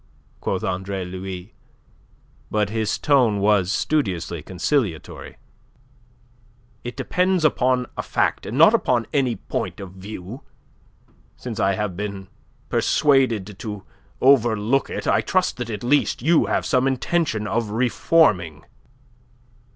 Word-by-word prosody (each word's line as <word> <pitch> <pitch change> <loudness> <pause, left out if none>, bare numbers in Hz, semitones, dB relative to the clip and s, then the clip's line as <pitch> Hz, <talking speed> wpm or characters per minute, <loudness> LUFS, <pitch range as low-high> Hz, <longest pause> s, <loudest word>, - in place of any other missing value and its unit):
quoth - - -2
Andre 95 0 -3
Louis, 90 0 -7 1.0
but 105 -1 0
his 110 -1 -1
tone 125 -8 +3
was 100 -2 +2
studiously 95 - -1
conciliatory. 95 - -2 1.5
"It 120 - -7
depends 180 -2 +1
upon 125 -3 +2
a - - -2
fact, - - -1
and 115 - -4
not 165 +8 +7
upon 125 - +1
any 130 -5 +1
point - - -4
of 95 -2 -8
view. 95 +5 -9 1.0
Since 120 -4 -6
I 95 0 +2
have 105 -3 -3
been 100 -1 -5 0.4
persuaded 115 -9 +1
to 105 -3 -6 0.4
overlook 120 -1 +3
it, - - -5
I - - +3
trust 185 0 0
that 120 -2 -4
at 105 -1 -5
least 130 -1 +1
you 160 +2 +3
have - - 0
some 130 -1 +2
intention 135 -3 0
of 110 0 -1
reforming." 105 - +2
110 Hz, 120 wpm, -22 LUFS, 95-135 Hz, 1.5 s, not